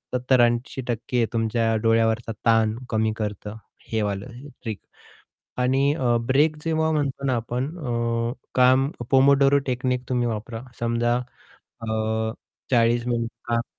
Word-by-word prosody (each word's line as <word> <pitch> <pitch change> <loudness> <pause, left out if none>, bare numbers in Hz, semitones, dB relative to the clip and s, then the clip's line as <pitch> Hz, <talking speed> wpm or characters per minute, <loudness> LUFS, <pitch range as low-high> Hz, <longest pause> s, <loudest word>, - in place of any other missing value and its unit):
70-80% 120 -1 +1
तुमच्या 115 0 +1
डोळ्यावरचा 115 0 +2
ताण 110 -1 +3
कमी 110 -1 +1
करतं 105 0 -4 0.4
हे 110 -1 +1
वालं 115 +6 -4 0.2
ट्रिक 110 -5 -4 0.8
आणि 135 +3 +2
अ, 125 -6 +1
ब्रेक 150 +4 +3
जेव्हा 160 0 +1
म्हणतो 140 -2 -1
ना 130 - +2
आपण 120 +4 -2
अ, 115 -3 -1 0.2
काम 130 +2 +4 0.2
पोमोडोरो 140 +1 +5
टेकनीक 125 0 -1
तुम्ही 125 -1 +1
वापरा 115 +1 -5 0.2
समजा 120 0 +1 0.4
अ, 110 0 -3 0.4
40 120 0 +3
मिनिट 115 -1 -1 0.2
काम 115 0 0
120 Hz, 120 wpm, -24 LUFS, 115-130 Hz, 0.8 s, पोमोडोरो